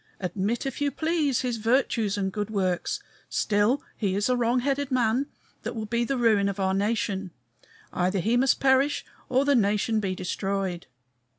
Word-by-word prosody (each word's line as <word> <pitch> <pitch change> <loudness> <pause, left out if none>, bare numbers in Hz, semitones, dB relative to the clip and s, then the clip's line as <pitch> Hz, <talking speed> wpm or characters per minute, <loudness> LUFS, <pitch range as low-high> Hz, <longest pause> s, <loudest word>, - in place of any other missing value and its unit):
Admit, 195 +6 -2
if 270 +1 -4
you 290 - +2
please, 315 -4 0
his 245 -2 -1
virtues 225 -2 +1
and 190 -1 -1
good 210 -1 -3
works; 185 -4 -1 0.3
still, 210 +6 +1
he 195 -4 -1
is 205 +4 +1
a 250 - +3
wrong 245 +1 +1
headed 275 +1 -1
man, 250 +1 +1 0.3
that - - -5
will 220 -1 -3
be 235 +2 0
the 270 +3 -1
ruin 215 -4 +3
of 200 0 -5
our 190 0 +1
nation. 200 -1 -1 0.6
Either 185 +2 +1
he 220 +6 +1
must 260 +2 +3
perish 270 +2 +3 0.2
or 260 +2 +2
the 285 - +4
nation 215 -1 +2
be 190 -3 -2
destroyed. 190 -1 -3
220 Hz, 175 wpm, -26 LUFS, 195-255 Hz, 0.6 s, the